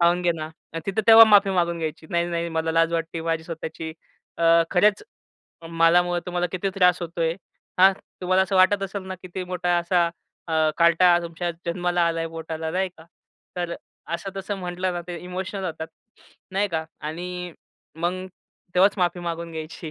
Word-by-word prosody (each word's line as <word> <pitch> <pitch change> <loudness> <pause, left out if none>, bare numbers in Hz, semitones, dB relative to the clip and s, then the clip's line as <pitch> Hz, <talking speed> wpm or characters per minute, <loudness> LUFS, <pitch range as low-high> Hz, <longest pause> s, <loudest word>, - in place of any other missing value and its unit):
खाऊन 175 +1 +3
घे 175 - +3
ना." 155 -1 -5
आणि 160 +1 -10
तिथं 195 +2 0
तेव्हा 225 0 +11
माफी 205 -2 +5
मागून 170 -2 0
घ्यायची, 160 0 -5
"नाही, 170 0 +1
नाही 170 0 -2
मला 160 0 -1
लाज 165 0 +3
वाटती 165 0 -2
माझी 165 -1 -2
स्वतःची, 160 -1 -6 0.5
अं, 165 0 +5
खरच, 205 +2 +3 0.7
मला 165 +1 +4
मुळं 175 0 -1
तुम्हाला 180 0 -1
किती 185 +1 -1
त्रास 180 -2 +4
होतोय. 165 -1 -1 0.5
हां, 190 +1 +7 0.3
तुम्हाला 185 +1 +3
असं 190 0 -1
वाटत 195 +2 +4
असेल 195 0 -4
ना, 190 - -4
किती 185 0 -6
मोठा 180 -1 0
असा 175 0 +2 0.4
अ, - - -3 0.3
कार्टा 170 +1 +5
तुमच्या 170 +1 -3 0.2
जन्माला 175 +1 0
आलाय 165 0 -2
पोटाला." 160 0 -5
नाही 190 +2 0
का. 160 - -14 0.5
तर 175 -1 -2 0.4
असं-तसं 195 +3 -5
म्हटलं 180 0 -2
ना, 175 - -3
ते 175 - -4
इमोशनल 185 +2 -5
होतात. 160 -2 -4 0.6
नाही 200 +2 +1
का 160 -3 -2 0.2
आणि 180 +2 -5 0.5
मग 185 +2 -2 0.5
तेव्हाच 195 +3 +5
माफी 175 0 +1
मागून 170 -1 -4
घ्यायची. 160 0 -7
175 Hz, 170 wpm, -24 LUFS, 165-185 Hz, 0.7 s, तेव्हा